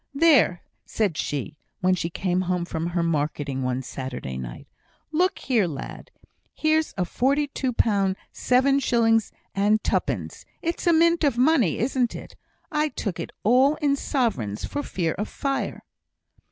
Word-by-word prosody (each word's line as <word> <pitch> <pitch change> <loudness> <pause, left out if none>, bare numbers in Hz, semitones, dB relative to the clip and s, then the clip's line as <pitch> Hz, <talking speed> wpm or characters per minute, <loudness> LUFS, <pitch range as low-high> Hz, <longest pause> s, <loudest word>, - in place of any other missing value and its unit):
"There!" 275 - +4 0.2
said 205 -7 -1
she, 150 +1 -3 0.2
when 185 0 +3
she 170 -2 -1
came 180 +1 -1
home 180 -1 -1
from 165 -1 -3
her 175 0 0
marketing 145 -4 -1
one 130 0 -1
Saturday 130 - -6
night, 60 -2 -7 0.4
"look 365 +4 +2
here, 230 -8 +1
lad! 145 -5 -7 0.5
Here's 315 0 +1
forty 275 - +1
two 270 -2 -2
pound, 200 -5 +2 0.2
seven 270 +2 +3
shillings, 225 -4 +2 0.2
and 205 +2 +2
twopence! - - -2 0.2
It's 335 +1 -2
a 340 - +6
mint 335 +1 +4
of 275 -5 +2
money, 255 - +3
isn't 245 0 0
it? - - -9 0.4
I 305 0 +1
took 195 - -4
it 165 - -5
all 260 +7 +5
in 285 -2 +1
sovereigns 215 - -1
for 290 - -3
fear 170 - -2
of 210 - -2
fire." 275 -1 -3
215 Hz, 150 wpm, -25 LUFS, 170-280 Hz, 0.5 s, a